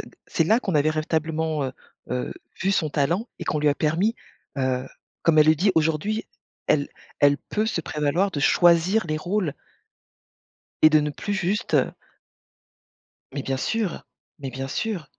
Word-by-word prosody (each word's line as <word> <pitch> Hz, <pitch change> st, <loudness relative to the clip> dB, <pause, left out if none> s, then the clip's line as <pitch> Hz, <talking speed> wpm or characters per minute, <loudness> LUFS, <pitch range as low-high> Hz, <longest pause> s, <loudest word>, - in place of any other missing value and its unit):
heu, -, -, -9 dB, 0.2 s
c'est 165 Hz, -, +1 dB
là 220 Hz, +7 st, +4 dB
qu'on 195 Hz, -8 st, -2 dB
avait 150 Hz, +1 st, +3 dB
véritablement, 155 Hz, -1 st, -1 dB
heu, 130 Hz, -, -3 dB, 0.4 s
heu, 125 Hz, 0 st, -2 dB, 0.3 s
vu 195 Hz, -, +2 dB
son 165 Hz, -5 st, +1 dB
talent 170 Hz, -, 0 dB
et -, -, -5 dB
qu'on 150 Hz, -, 0 dB
lui 150 Hz, 0 st, +2 dB
a 145 Hz, -, +3 dB
permis, 170 Hz, +10 st, +1 dB, 0.4 s
heu, 130 Hz, -1 st, 0 dB, 0.4 s
comme 160 Hz, -2 st, +4 dB
elle 155 Hz, -, +7 dB
le 155 Hz, -, +6 dB
dit 190 Hz, +6 st, +2 dB
aujourd'hui, 160 Hz, +7 st, +1 dB, 0.4 s
elle 145 Hz, -1 st, +2 dB, 0.3 s
elle 145 Hz, 0 st, +5 dB
peut 215 Hz, +1 st, -2 dB
se 175 Hz, -, -1 dB
prévaloir 155 Hz, +7 st, 0 dB
de 145 Hz, -, -3 dB
choisir 175 Hz, +6 st, +4 dB
les 155 Hz, 0 st, -1 dB
rôles 180 Hz, -2 st, -1 dB, 1.3 s
et 155 Hz, -, +9 dB
de 155 Hz, -, +6 dB
ne 150 Hz, 0 st, -1 dB
plus 205 Hz, +7 st, -4 dB
juste, 200 Hz, +4 st, -1 dB
heu -, -, +3 dB, 1.4 s
Mais 140 Hz, -, -3 dB
bien 135 Hz, 0 st, -2 dB
sûr, 210 Hz, +5 st, -2 dB, 0.4 s
mais 135 Hz, -2 st, -4 dB
bien 135 Hz, +1 st, -5 dB
sûr! 180 Hz, +1 st, -3 dB
155 Hz, 170 wpm, -24 LUFS, 145-190 Hz, 1.4 s, et